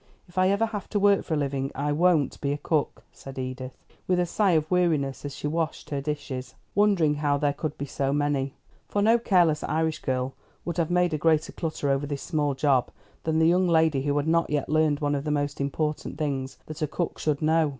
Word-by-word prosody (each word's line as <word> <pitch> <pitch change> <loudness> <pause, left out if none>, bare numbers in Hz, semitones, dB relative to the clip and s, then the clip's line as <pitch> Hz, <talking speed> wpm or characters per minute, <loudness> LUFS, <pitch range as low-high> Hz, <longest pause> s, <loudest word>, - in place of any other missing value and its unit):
If 175 - -20
I 185 0 +3
ever 200 +3 +2
have 215 -3 -6
to 205 - 0
work 200 0 +4
for 160 - -2
a - - 0
living 140 -1 -1
I 145 +2 -1
won't 160 -2 +2
be 140 - 0
a - - -2
cook," 150 0 -1
said 135 0 -11
Edith, 130 0 -5 0.3
with 180 -1 +2
a 180 - +2
sigh 195 +1 +2
of 155 0 +1
weariness 160 -7 +1
as 140 - -5
she - - -7
washed 160 +1 -2
her 140 -1 -1
dishes, 140 -3 -5 0.2
wondering 195 -7 +3
how 145 -1 +1
there 145 0 +1
could 150 0 -4
be 140 - -3
so 135 0 -1
many; 145 -1 0 0.3
for 205 - +1
no 230 +2 +5
careless 175 -8 +3
Irish 160 0 0
girl 130 0 -2 0.3
would 170 -1 -3
have 170 -2 +1
made 180 -1 +2
a 155 - -1
greater 155 -1 +2
clutter 155 -4 -2
over 135 +1 0
this 140 -1 -4
small 145 -4 0
job 135 -3 +2 0.4
than 160 0 +1
the 160 0 +4
young 180 +1 +3
lady 160 -4 +3
who 145 +1 0
had 145 +1 0
not 165 +1 +2
yet 145 -2 -1
learned 155 -1 +2
one 145 0 +1
of 140 -1 -1
the 150 - -3
most 145 -1 -1
important 150 +1 -2
things 135 -4 -2
that 155 +1 -8
a 155 - +1
cook 165 +4 -3
should 150 -2 0
know. 160 0 +3
150 Hz, 230 wpm, -26 LUFS, 140-170 Hz, 0.4 s, no